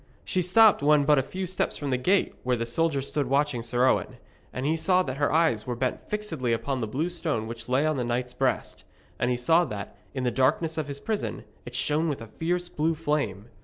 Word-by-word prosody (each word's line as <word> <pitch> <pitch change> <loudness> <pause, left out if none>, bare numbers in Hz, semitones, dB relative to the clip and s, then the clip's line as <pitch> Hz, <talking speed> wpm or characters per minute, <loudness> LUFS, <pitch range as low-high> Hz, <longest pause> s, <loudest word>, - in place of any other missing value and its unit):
She 185 - 0
stopped 200 +3 +5
when 145 0 +4
but 150 -1 +5
a - - +3
few 185 +8 -5
steps 185 +1 -1
from 145 -2 -3
the - - +3
gate 190 +10 +2
where 125 0 +1
the 115 -1 -2
soldiers 140 +2 0
stood 145 -3 -1
watching 140 -2 +1
Sir 120 +2 +1
Owen; - - +1 0.3
and 130 - -4
he 155 +2 +2
saw 185 +3 +3
that 130 -3 -4
her 145 0 +1
eyes 130 -10 +2
were 125 - -2
bent 125 +1 -3
fixedly 210 - -2
upon 130 +3 -2
the 110 - -1
blue 140 +10 -1
stone 160 -11 -2
which 115 +1 -8
lay 130 +4 +2
on 155 -2 +1
the 125 - 0
knight's 125 +1 -2
breast. 130 -1 -1 0.4
And 120 - +1
he 125 - +1
saw 160 +8 +4
that, 105 -4 -6 0.2
in 130 - -2
the 125 - +1
darkness 155 +6 +1
of 150 - -3
his 140 -1 -5
prison, 215 +6 -3 0.2
it - - -8
shone 155 +2 +1
with 145 - -3
a 115 - -13
fierce 175 +2 0
blue 160 -1 0
flame. 140 -10 -2
140 Hz, 235 wpm, -27 LUFS, 125-165 Hz, 0.4 s, stopped